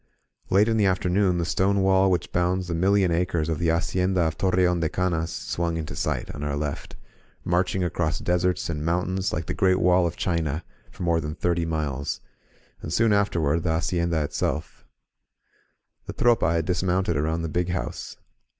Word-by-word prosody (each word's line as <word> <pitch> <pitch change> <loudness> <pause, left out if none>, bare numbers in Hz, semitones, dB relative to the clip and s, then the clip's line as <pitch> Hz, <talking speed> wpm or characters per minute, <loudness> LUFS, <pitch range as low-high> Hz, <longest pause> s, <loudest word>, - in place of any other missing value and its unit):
Late 100 +3 +4
in 110 -1 +1
the 105 -2 +3
afternoon 95 0 +1
the 85 - 0
stone 95 +3 +1
wall 95 0 +4
which 90 -2 -1
bounds 90 +1 0
the 85 - -3
million 95 +2 +2
acres 85 -2 0
of 80 - -1
the 85 - 0
Hacienda 90 +3 +1
of 80 -1 0
Torreon 90 -2 +2
de 80 -1 0
Canas 85 -2 -1
swung 85 -1 -2
into 80 -1 -5
sight - - -2
on - - -8
our 75 -1 -1
left, 75 0 -4 0.5
marching 90 +1 +1
across 85 -2 -1
deserts 90 +1 0
and 75 -3 -3
mountains 90 +4 -1
like 80 +1 -3
the - - -3
Great 95 -1 +2
Wall 90 -1 +4
of 85 - -5
China, 80 -3 -1 0.3
for - - -8
more 85 -1 +2
than 75 -1 -5
thirty 85 -1 0
miles; 70 -4 -2 0.6
and, 80 - -6
soon 110 +4 +3
afterward, 85 -6 +1
the 80 -1 0
hacienda 85 -1 0
itself. 75 +1 -3 1.2
The - - -5
Tropa 115 -9 +3
had 85 -1 0
dismounted 90 +1 0
around 80 +3 -1
the - - -1
Big 90 +3 -1
House. 90 -1 -4
85 Hz, 175 wpm, -25 LUFS, 80-95 Hz, 1.2 s, Late